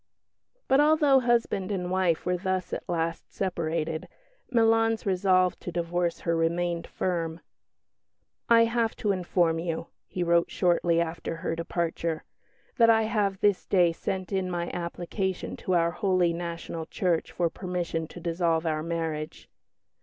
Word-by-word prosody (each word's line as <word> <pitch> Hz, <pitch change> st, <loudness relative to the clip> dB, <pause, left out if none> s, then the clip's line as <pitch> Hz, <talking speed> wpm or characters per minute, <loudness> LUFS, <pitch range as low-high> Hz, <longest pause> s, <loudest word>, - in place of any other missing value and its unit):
But, 265 Hz, +1 st, +4 dB
although 295 Hz, -2 st, +5 dB
husband 235 Hz, -6 st, +1 dB
and 180 Hz, -2 st, -2 dB
wife 185 Hz, -3 st, +1 dB
were 180 Hz, 0 st, +1 dB
thus 185 Hz, 0 st, -2 dB
at -, -, -5 dB
last 165 Hz, -1 st, -2 dB
separated, 165 Hz, -2 st, -2 dB, 0.4 s
Milan's 225 Hz, -2 st, +3 dB
resolve 185 Hz, -1 st, +2 dB
to 175 Hz, -, -6 dB
divorce 170 Hz, 0 st, -1 dB
her 170 Hz, -1 st, 0 dB
remained 170 Hz, +1 st, 0 dB
firm. 165 Hz, -2 st, -2 dB, 1.1 s
"I 230 Hz, -1 st, +7 dB
have 230 Hz, -1 st, 0 dB
to 210 Hz, -, 0 dB
inform 175 Hz, -3 st, +1 dB
you," 165 Hz, -1 st, -3 dB, 0.2 s
he 180 Hz, -, -2 dB
wrote 170 Hz, 0 st, +3 dB
shortly 175 Hz, -2 st, +2 dB
after 165 Hz, 0 st, -2 dB
her 165 Hz, 0 st, -3 dB
departure, 165 Hz, -1 st, -2 dB, 0.5 s
"that 230 Hz, -1 st, +6 dB
I 225 Hz, -1 st, +5 dB
have 205 Hz, -3 st, 0 dB
this 205 Hz, -2 st, +2 dB
day 180 Hz, -3 st, +4 dB
sent 185 Hz, +3 st, -4 dB
in 190 Hz, -1 st, 0 dB
my 175 Hz, -1 st, -2 dB
application 180 Hz, +2 st, -3 dB
to 185 Hz, -, -1 dB
our 170 Hz, 0 st, +3 dB
Holy 185 Hz, -3 st, +1 dB
National 170 Hz, -1 st, -5 dB
Church 175 Hz, -3 st, 0 dB
for 170 Hz, -2 st, 0 dB
permission 175 Hz, -3 st, -3 dB
to 175 Hz, -, -10 dB
dissolve 165 Hz, -1 st, 0 dB
our 155 Hz, -1 st, 0 dB
marriage." 160 Hz, -2 st, -4 dB
175 Hz, 145 wpm, -27 LUFS, 165-190 Hz, 1.1 s, I